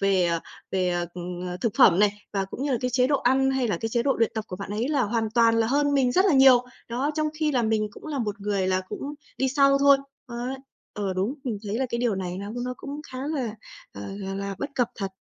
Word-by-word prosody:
về, 195 Hz, -2 st, +3 dB
ờ, 170 Hz, -1 st, 0 dB, 0.3 s
về, 185 Hz, -1 st, +1 dB
ờ, 175 Hz, -1 st, -1 dB, 0.5 s
thực 230 Hz, -, 0 dB
phẩm 175 Hz, -2 st, +7 dB
này 205 Hz, 0 st, +4 dB, 0.2 s
và 195 Hz, -1 st, 0 dB
cũng 195 Hz, +7 st, -7 dB
như 285 Hz, -, 0 dB
là 245 Hz, -, +1 dB
cái 250 Hz, -, -1 dB
chế 250 Hz, +1 st, +3 dB
độ 285 Hz, -, +3 dB
ăn 265 Hz, +1 st, +2 dB
hay 265 Hz, -3 st, 0 dB
là 190 Hz, -, 0 dB
cái 225 Hz, -, -1 dB
chế 235 Hz, +1 st, 0 dB
độ 270 Hz, +2 st, +2 dB
luyện 230 Hz, -1 st, +2 dB
tập 220 Hz, -1 st, -3 dB
của 180 Hz, -, -5 dB
bạn 200 Hz, 0 st, -7 dB
ấy 220 Hz, +5 st, -1 dB
là 290 Hz, -4 st, +2 dB
hoàn 225 Hz, 0 st, -1 dB
toàn 230 Hz, 0 st, +4 dB
là 225 Hz, -, +2 dB
hơn 285 Hz, +3 st, +2 dB
mình 255 Hz, -3 st, +3 dB
rất 375 Hz, -, +4 dB
là 380 Hz, -, +4 dB
nhiều. 265 Hz, -2 st, +7 dB, 0.2 s
Đó, 255 Hz, +5 st, -1 dB
trong 310 Hz, 0 st, 0 dB
khi 305 Hz, -1 st, 0 dB
là 245 Hz, -3 st, +2 dB
mình 220 Hz, -1 st, +1 dB
cũng -, -, -12 dB
là 295 Hz, -3 st, -3 dB
một 210 Hz, -3 st, -3 dB
người 200 Hz, -2 st, 0 dB
là 185 Hz, 0 st, +1 dB
cũng 285 Hz, +1 st, -5 dB, 0.2 s
đi 265 Hz, -, +2 dB
sau 275 Hz, 0 st, +4 dB
thôi, 280 Hz, 0 st, +7 dB, 0.3 s
ấy. 245 Hz, +1 st, -4 dB, 0.4 s
Ờ, 200 Hz, -2 st, -2 dB
đúng, 195 Hz, +8 st, -1 dB
mình 230 Hz, -6 st, -2 dB
thấy 205 Hz, +3 st, -2 dB
là 265 Hz, -, 0 dB
cái 235 Hz, -, -2 dB
điều 240 Hz, -3 st, +1 dB
này 185 Hz, -1 st, -4 dB
nó 200 Hz, +1 st, -6 dB
nó 250 Hz, 0 st, -3 dB
cũng 285 Hz, +3 st, -7 dB
khá 255 Hz, -, -8 dB
là, 260 Hz, -8 st, -2 dB, 0.4 s
ờ, 100 Hz, -, -8 dB
là 195 Hz, -1 st, -5 dB
là 200 Hz, 0 st, -4 dB
bất 280 Hz, -, -4 dB
cập 245 Hz, -3 st, +1 dB
thật. 195 Hz, -2 st, -4 dB
235 Hz, 270 wpm, -25 LUFS, 200-270 Hz, 0.5 s, phẩm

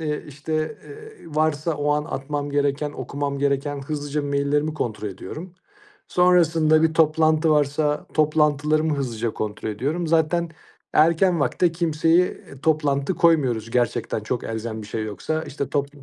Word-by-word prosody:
eee, 150 Hz, -2 st, -3 dB
işte, 150 Hz, +2 st, -5 dB, 0.3 s
eee, 440 Hz, +1 st, -11 dB
varsa 155 Hz, +1 st, 0 dB
o 145 Hz, 0 st, -1 dB
an 150 Hz, 0 st, 0 dB
atmam 145 Hz, -1 st, -4 dB
gereken, 145 Hz, +1 st, 0 dB
okumam 140 Hz, -1 st, -4 dB
gereken, 140 Hz, 0 st, 0 dB
hızlıca 145 Hz, 0 st, -3 dB
maillerimi 145 Hz, +2 st, 0 dB
kontrol 110 Hz, -6 st, -3 dB
ediyorum. 155 Hz, -, -8 dB, 0.5 s
Sonrasında 165 Hz, -3 st, +4 dB
bir 160 Hz, 0 st, +2 dB
toplantı 155 Hz, 0 st, +3 dB
varsa 150 Hz, 0 st, +1 dB
toplantılarımı 150 Hz, 0 st, +2 dB
hızlıca 120 Hz, -4 st, -2 dB
kontrol 110 Hz, 0 st, -4 dB
ediyorum. 145 Hz, +11 st, -2 dB
Zaten 165 Hz, +1 st, +1 dB, 0.4 s
erken 170 Hz, +2 st, +4 dB
vakite 170 Hz, +3 st, +1 dB
kimseye, 165 Hz, -1 st, +2 dB
eee, 140 Hz, -6 st, -11 dB
toplantı 150 Hz, 0 st, +1 dB
koymuyoruz. 130 Hz, -10 st, +2 dB
Gerçekten 120 Hz, -2 st, 0 dB
çok 115 Hz, +3 st, -3 dB
elzem 110 Hz, 0 st, -4 dB
bir 105 Hz, -, -9 dB
şey 110 Hz, +1 st, -3 dB
yoksa. 155 Hz, +9 st, -3 dB
İşte, 140 Hz, 0 st, -5 dB
top 140 Hz, -1 st, 0 dB
150 Hz, 140 wpm, -23 LUFS, 140-160 Hz, 0.5 s, Sonrasında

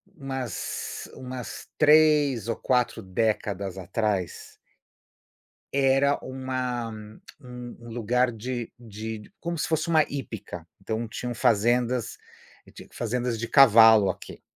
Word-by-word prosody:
umas 135 Hz, -, -5 dB
umas 125 Hz, -1 st, -7 dB
3 150 Hz, -6 st, +4 dB
ou 115 Hz, -, 0 dB
4 125 Hz, -3 st, 0 dB
décadas 100 Hz, -1 st, -2 dB
atrás 95 Hz, -1 st, -2 dB, 1.2 s
era 135 Hz, +1 st, +3 dB
uma 130 Hz, -2 st, -3 dB, 0.5 s
um 125 Hz, -3 st, -9 dB
um 120 Hz, 0 st, -11 dB
lugar 120 Hz, +2 st, +1 dB
de 120 Hz, +1 st, -5 dB
de 110 Hz, -1 st, -8 dB
como 170 Hz, 0 st, -3 dB
se -, -, -1 dB
fosse 160 Hz, +1 st, 0 dB
uma 160 Hz, -2 st, +4 dB
hípica, 105 Hz, -11 st, -7 dB
então 110 Hz, +3 st, -3 dB
tinham 120 Hz, +2 st, -5 dB
fazendas 120 Hz, +1 st, +1 dB, 0.6 s
tinha -, -, -12 dB
fazendas 120 Hz, 0 st, -2 dB
de 115 Hz, -, -3 dB
cavalo 110 Hz, -6 st, +7 dB
aqui. -, -, -7 dB
120 Hz, 110 wpm, -26 LUFS, 110-130 Hz, 1.2 s, cavalo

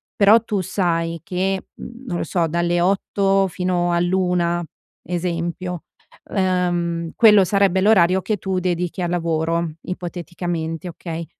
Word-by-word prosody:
però 210 Hz, +3 st, +6 dB
tu 210 Hz, -3 st, -2 dB
sai 165 Hz, -3 st, -1 dB
che, 190 Hz, +2 st, -2 dB
uhm, 240 Hz, +2 st, -10 dB
non 175 Hz, -, -2 dB
lo -, -, -2 dB
so, 175 Hz, -2 st, 0 dB
dalle 170 Hz, +1 st, 0 dB
8 195 Hz, +1 st, +2 dB
fino 180 Hz, -1 st, -1 dB
all'1 175 Hz, -1 st, +1 dB, 0.4 s
esempio, 175 Hz, 0 st, -3 dB, 0.5 s
ehm, 175 Hz, -3 st, 0 dB
quello 210 Hz, -4 st, +6 dB
sarebbe 195 Hz, 0 st, +2 dB
l'orario 190 Hz, -3 st, +4 dB
che 215 Hz, -, -1 dB
tu 190 Hz, -1 st, -2 dB
dedichi 180 Hz, 0 st, -2 dB
al 175 Hz, -, -1 dB
lavoro 165 Hz, -1 st, 0 dB, 0.2 s
ipoteticamente, 175 Hz, -1 st, -5 dB
okay. 165 Hz, -1 st, -6 dB
180 Hz, 125 wpm, -21 LUFS, 170-190 Hz, 0.5 s, però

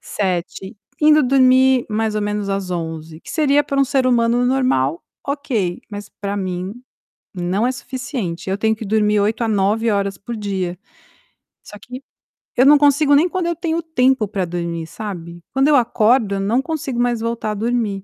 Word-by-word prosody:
7h, 190 Hz, +2 st, -3 dB, 0.2 s
indo 305 Hz, 0 st, +5 dB
dormir 260 Hz, -1 st, +4 dB
mais 220 Hz, 0 st, -1 dB
ou -, -, 0 dB
menos 205 Hz, -1 st, -2 dB
às 195 Hz, -1 st, -2 dB
23h, 160 Hz, -2 st, -5 dB
que -, -, -11 dB
seria 290 Hz, -2 st, +3 dB
para 275 Hz, -1 st, -1 dB
um -, -, +5 dB
ser 270 Hz, -1 st, 0 dB
humano 240 Hz, -1 st, +2 dB
normal, 250 Hz, -, +1 dB, 0.2 s
ok, 260 Hz, -, -2 dB
mas 205 Hz, -1 st, -8 dB
pra 200 Hz, 0 st, -3 dB
mim, 185 Hz, 0 st, -4 dB, 0.6 s
não 185 Hz, +6 st, -1 dB
é -, -, +1 dB
suficiente, 245 Hz, -, -5 dB
eu 190 Hz, -, -1 dB
tenho 220 Hz, +1 st, +1 dB
que 220 Hz, 0 st, -7 dB
dormir 210 Hz, 0 st, +2 dB
8 215 Hz, +3 st, 0 dB
a 225 Hz, -, 0 dB
9 215 Hz, +2 st, +1 dB
horas 200 Hz, -1 st, -1 dB
por 235 Hz, +3 st, -7 dB
dia. 190 Hz, -4 st, -3 dB, 0.9 s
Só 210 Hz, -, -11 dB
que 250 Hz, +5 st, -9 dB, 0.6 s
eu 250 Hz, -, +4 dB
não 295 Hz, +2 st, +8 dB
consigo 290 Hz, 0 st, +4 dB
nem 310 Hz, +5 st, +4 dB
quando 360 Hz, -1 st, -2 dB
eu 340 Hz, -, -1 dB
tenho 335 Hz, 0 st, -2 dB
tempo 265 Hz, -8 st, +1 dB
para 195 Hz, -2 st, -2 dB
dormir, 170 Hz, -1 st, -4 dB
sabe. 175 Hz, -2 st, -8 dB
Quando 270 Hz, +1 st, +3 dB
eu 295 Hz, -, +5 dB
acordo, 230 Hz, -3 st, +2 dB
eu -, -, -2 dB
não 220 Hz, +7 st, +1 dB
consigo 280 Hz, -6 st, -4 dB
mais 240 Hz, -1 st, +1 dB
voltar 230 Hz, -1 st, -2 dB
a -, -, -2 dB
dormir. 220 Hz, -3 st, -1 dB
220 Hz, 185 wpm, -19 LUFS, 195-260 Hz, 0.9 s, não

